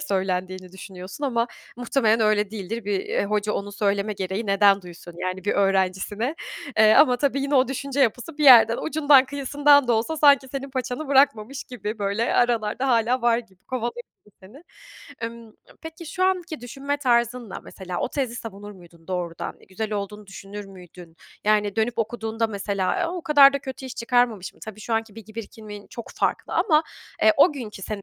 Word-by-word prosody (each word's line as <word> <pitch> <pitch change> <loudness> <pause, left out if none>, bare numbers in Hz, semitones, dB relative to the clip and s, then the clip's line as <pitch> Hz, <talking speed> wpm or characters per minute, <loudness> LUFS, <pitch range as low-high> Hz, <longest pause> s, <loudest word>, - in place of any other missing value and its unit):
söylendiğini 185 -5 -3
düşünüyorsun 190 - -8
ama 235 -3 0 0.3
muhtemelen 230 -2 +1
öyle 210 -2 +2
değildir. 220 +2 -5
Bir, 200 -2 -2
ııı, - - +1
hoca 210 0 -1
onu 205 0 -4
söyleme 205 +1 0
gereği 195 +3 -4
neden 200 0 +4
duysun, 175 -1 -12
yani, 185 0 -4
bir - - +1
öğrencisine? 195 - 0 0.4
Eee, 215 0 +7
ama 255 -5 +6
tabii 275 +1 0
yine 280 +1 -1
o 260 -1 +4
düşünce 275 +1 -3
yapısı 265 +5 0
bir 300 - +1
yerden, 235 -3 +8
ucundan 290 -4 +4
kıyısından 285 0 +3
da - - +4
olsa 235 +9 0
sanki 285 -3 +5
senin 275 +1 -6
paçanı 260 +2 -4
bırakmamış 275 -2 +2
gibi, 215 -3 -6
böyle, 200 +3 -1
aralarda 240 +1 +1
hâlâ 240 +1 +2
var 235 -1 +3
gibi, 195 -6 -13
kovalıyor 240 -1 -4 0.2
gibi 210 - -24
seni. 235 - -15 0.6
Emm, 230 -1 -7 0.3
peki, 325 +1 -9
şu 370 +4 -1
anki 360 -5 -1
düşünme 275 +4 -4
tarzınla, 240 -4 0
mesela, 185 -2 -7
o - - -1
tezi 255 -5 -2
savunur 205 -3 -8
muydun 170 -3 -18
doğrudan? 175 -3 -4
Güzel 215 +3 -4
olduğunu 210 0 -5
düşünür 200 +1 -9
müydün? 180 -3 -14 0.3
Yani, 210 -1 +2
dönüp 225 +2 0
okuduğunda 225 0 -2
mesela, 200 - -2
eee, 350 - +1
o 350 +1 -5
kadar 285 -3 +7
da 280 - -1
kötü 265 -1 -8
iş 255 - -8
çıkarmamışım. 235 -5 0
Tabii 215 -1 -9
şu 225 +1 -2
anki 225 -2 -2
bilgi 220 -1 -13
birikimin 210 -2 -9
çok 235 - -9
farklı - - -1
ama, 310 -1 +3 0.4
eee, 325 - +6
o 310 +4 +6
günkü 225 -8 -8
seni 205 0 -5
225 Hz, 175 wpm, -24 LUFS, 200-265 Hz, 0.6 s, yerden